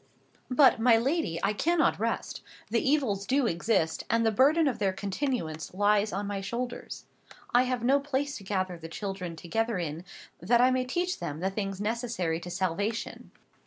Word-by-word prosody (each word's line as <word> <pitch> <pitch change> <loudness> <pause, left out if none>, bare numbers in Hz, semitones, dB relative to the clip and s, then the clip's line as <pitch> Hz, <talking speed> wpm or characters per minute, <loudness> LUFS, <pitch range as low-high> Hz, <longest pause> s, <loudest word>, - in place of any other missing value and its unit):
"But, 260 -1 +5
my 230 0 +5
lady, 245 - 0
I 200 +2 +2
cannot 330 +9 +2
rest. - - -2 0.3
The 230 - +2
evils 250 -9 +1
do 270 0 +2
exist, 170 -4 0
and 230 +1 +2
the 225 - +3
burden 290 +8 +4
of 245 -5 -1
their 195 -2 +1
continuance 190 - -3
lies 205 +1 +3
on 200 +2 -3
my 200 -1 -3
shoulders. 240 +5 -5 0.5
I 245 +1 +5
have 250 -2 -2
no 270 +3 +4
place 285 0 -2
to 200 - -11
gather 185 -3 -2
the 165 0 -8
children 190 -2 -5
together 225 +7 -1
in, 165 -1 -4 0.4
that 235 +7 +3
I 250 +1 +5
may 255 0 +1
teach 350 +8 -2
them 150 +1 -4
the 190 +3 -1
things 195 -1 -3
necessary 210 -6 -1
to 175 - -8
salvation. 195 +5 -2
215 Hz, 175 wpm, -28 LUFS, 185-255 Hz, 0.5 s, But